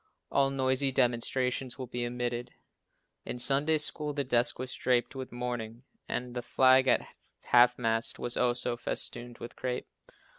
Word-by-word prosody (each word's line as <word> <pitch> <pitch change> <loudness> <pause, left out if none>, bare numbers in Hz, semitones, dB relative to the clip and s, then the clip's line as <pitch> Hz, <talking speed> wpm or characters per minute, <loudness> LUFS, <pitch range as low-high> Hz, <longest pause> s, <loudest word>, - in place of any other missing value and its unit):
All 135 -1 +3
noisy 135 0 +1
demonstrations 125 +1 0
will 130 - -5
be 120 0 -3
omitted. 120 0 -4 0.7
In - - -5
Sunday 140 +5 +3
school 150 0 -1
the 140 -1 -1
desk 120 -2 +2
was 130 +1 -5
draped 125 -1 +1
with 130 -1 -6
mourning, 120 -1 -5 0.3
and 125 0 -3
the 125 - -3
flag 130 +2 +4
at 125 - +3 0.4
half 125 0 +5
mast 115 -1 0
was 120 - 0
also 125 0 0
festooned 120 0 -5
with 120 - -9
crape. 125 -1 -3
125 Hz, 150 wpm, -30 LUFS, 120-130 Hz, 0.7 s, half